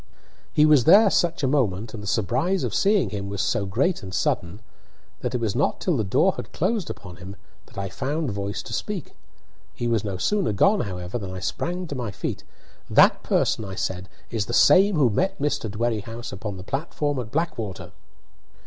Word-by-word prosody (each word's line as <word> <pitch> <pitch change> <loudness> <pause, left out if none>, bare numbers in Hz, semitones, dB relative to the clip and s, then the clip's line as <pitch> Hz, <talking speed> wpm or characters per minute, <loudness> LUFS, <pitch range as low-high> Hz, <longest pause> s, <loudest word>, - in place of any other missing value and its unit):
He 150 - +4
was 150 -5 +5
there 200 +4 +7
such 170 -2 +1
a - - +3
moment, 115 -6 0
and 110 - -6
the 105 - -8
surprise 125 - 0
of - - -2
seeing 205 -1 +2
him 100 -1 -4
was 100 0 -4
so 100 +1 0
great 135 - 0
and 95 - -8
sudden, 90 +1 -1 0.6
that - - -3
it - - 0
was 110 -4 -1
not 140 - +1
till 180 - 0
the 115 - 0
door 95 - +3
had - - -7
closed 195 +1 -1
upon 90 -3 -8
him 95 +3 -9 0.3
that - - -18
I 100 0 -2
found 140 - -2
voice 100 0 -4
to - - -8
speak. - - -4 0.6
He 120 - -2
was 115 -3 +1
no 100 -3 -3
sooner 195 - +1
gone, 195 - +4
however, 90 +1 -4
than 100 -3 -6
I 95 - -6
sprang 180 - -3
to 155 - -6
my 125 -5 -3
feet. 100 - -5 0.5
"That - - +5
person," 110 - +1
I 95 -2 -6
said, 95 0 -3 0.2
"is 110 -3 -1
the 120 - -4
same 195 +1 +6
who 135 -7 +3
met 190 - 0
Mr. 145 - -1
Dwerrihouse 115 +1 -3
upon 100 0 -5
the 90 - -8
platform 145 - -2
at 120 -3 -5
Blackwater!" 115 - -3
115 Hz, 200 wpm, -24 LUFS, 100-155 Hz, 0.6 s, there